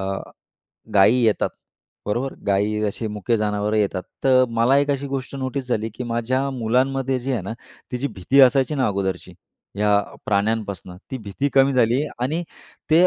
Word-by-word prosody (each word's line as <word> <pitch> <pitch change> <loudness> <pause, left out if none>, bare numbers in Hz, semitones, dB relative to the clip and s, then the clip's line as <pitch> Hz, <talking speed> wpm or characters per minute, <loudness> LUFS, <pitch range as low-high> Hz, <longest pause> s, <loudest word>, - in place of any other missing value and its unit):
अ, 95 0 -2 0.8
गाई 100 +4 +6
येतात. 110 -2 +2 0.6
बरोबर? 120 +6 -1
गाई 105 +2 +1
असे 110 +2 -5
मुके 105 +3 -1
जनावरं 105 0 0
येतात. 100 -3 0 0.2
तर 130 -1 +5
मला 115 +4 +3
एक 145 0 +1
अशी 140 0 -1
गोष्ट 135 0 -4
नोटीस 130 0 -3
झाली, 110 -2 0
की 125 - -5
माझ्या 120 +3 -1
मुलांमध्ये 130 +2 0
जी 135 +2 -2
आहे 120 - 0
ना, 100 - -5 0.4
तिची 125 +3 -1
भीती 115 +8 +2
असायची 135 +2 +5
ना 130 -3 +1
अगोदरची 95 -2 -2 0.4
या 105 0 +3 0.3
प्राण्यांपासून, 100 -3 -1
ती 130 - -4
भीती 110 +6 -2
कमी 135 0 +5
झाली 125 +2 +3 0.2
आणि 155 +7 0 0.5
ते 170 +4 +6
120 Hz, 160 wpm, -22 LUFS, 105-135 Hz, 0.8 s, गाई